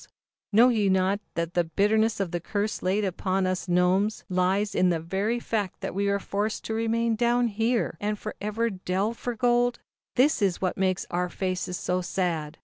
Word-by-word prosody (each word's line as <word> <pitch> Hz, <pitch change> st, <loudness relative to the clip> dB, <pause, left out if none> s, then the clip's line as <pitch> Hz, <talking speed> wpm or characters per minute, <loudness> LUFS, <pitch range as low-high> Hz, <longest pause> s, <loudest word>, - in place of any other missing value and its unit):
^^s -, -, -13 dB
^*&WA*Tto^MffM&"^ -, -, -19 dB
^^xr^ -, -, -33 dB, 0.2 s
" -, -, -68 dB
Know 245 Hz, +3 st, +8 dB
ye 215 Hz, -5 st, +2 dB
not 190 Hz, +1 st, +2 dB, 0.2 s
that 170 Hz, 0 st, -2 dB
the 175 Hz, -, +2 dB
bitterness 210 Hz, +6 st, +1 dB
of 190 Hz, -4 st, -1 dB
the 175 Hz, -, -1 dB
curse 205 Hz, +5 st, -2 dB
laid 195 Hz, +3 st, +1 dB
upon 190 Hz, +1 st, -1 dB
us 185 Hz, 0 st, -2 dB
Gnomes 185 Hz, +4 st, +2 dB
lies 185 Hz, +3 st, +1 dB
in 185 Hz, -, +3 dB
the 170 Hz, -2 st, +1 dB
very 195 Hz, +8 st, -1 dB
fact 210 Hz, -5 st, -3 dB
that -, -, -4 dB
we 200 Hz, +2 st, 0 dB
are 200 Hz, -, +2 dB
forced 205 Hz, +2 st, -2 dB
to 220 Hz, -, -3 dB
remain 230 Hz, +1 st, +1 dB
down 240 Hz, +1 st, +2 dB
here 225 Hz, -3 st, 0 dB
and 210 Hz, +1 st, -1 dB
forever 215 Hz, +2 st, -3 dB
delve 195 Hz, +4 st, -2 dB
for 245 Hz, -1 st, -3 dB
gold? 245 Hz, +1 st, +2 dB, 0.4 s
This 265 Hz, 0 st, +3 dB
it -, -, +5 dB
is 180 Hz, -, -3 dB
which 185 Hz, -2 st, -1 dB
makes 185 Hz, -1 st, 0 dB
our 180 Hz, +1 st, 0 dB
faces 185 Hz, -1 st, -3 dB
so 180 Hz, 0 st, -1 dB
sad. 165 Hz, -4 st, -2 dB
200 Hz, 210 wpm, -26 LUFS, 185-220 Hz, 0.4 s, Know